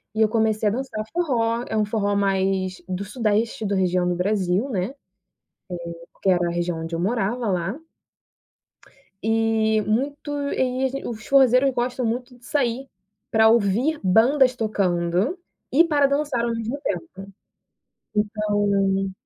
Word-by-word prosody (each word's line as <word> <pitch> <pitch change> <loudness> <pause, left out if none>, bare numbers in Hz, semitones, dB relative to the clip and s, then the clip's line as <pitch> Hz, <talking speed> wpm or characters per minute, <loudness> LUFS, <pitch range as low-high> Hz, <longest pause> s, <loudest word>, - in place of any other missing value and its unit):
E 220 - +1
eu 220 - +6
comecei 220 -1 +1
a - - -1
dançar 245 -3 -3
forró, 240 -8 0
é - - -2
um 215 - +2
forró 205 -1 0
mais 190 -1 0
do 185 +1 -3
sudeste, 215 0 -1
da 200 0 0
região 180 -1 +1
do 180 - 0
Brasil, 190 +4 0
né. 190 -3 -1 1.1
Eh, 170 - -14 0.2
que 195 - +3
era 175 -1 +2
a - - -2
região 170 -1 -2
onde 165 +1 -5
eu 165 - -2
morava 230 +4 -1
lá. 190 - -1 1.5
E 225 -1 +2
muito 275 +8 -2 0.2
e, 255 0 0
assim, 270 +1 -2
os 220 -2 -6
forrozeiros 270 0 +5
gostam 245 +1 -2
muito 245 +2 -3
de 240 - -23
sair, 260 0 -1 0.4
pra 220 0 +5
ouvir 235 +7 +2
bandas 250 +7 +4
tocando 185 - 0 0.3
e 320 +5 +6
para 290 -4 +3
dançar 280 -4 0
ao 235 - -1
mesmo 230 +5 -4
tempo. 200 - -5 0.8
Então 205 -2 +1
220 Hz, 145 wpm, -23 LUFS, 195-250 Hz, 1.5 s, eu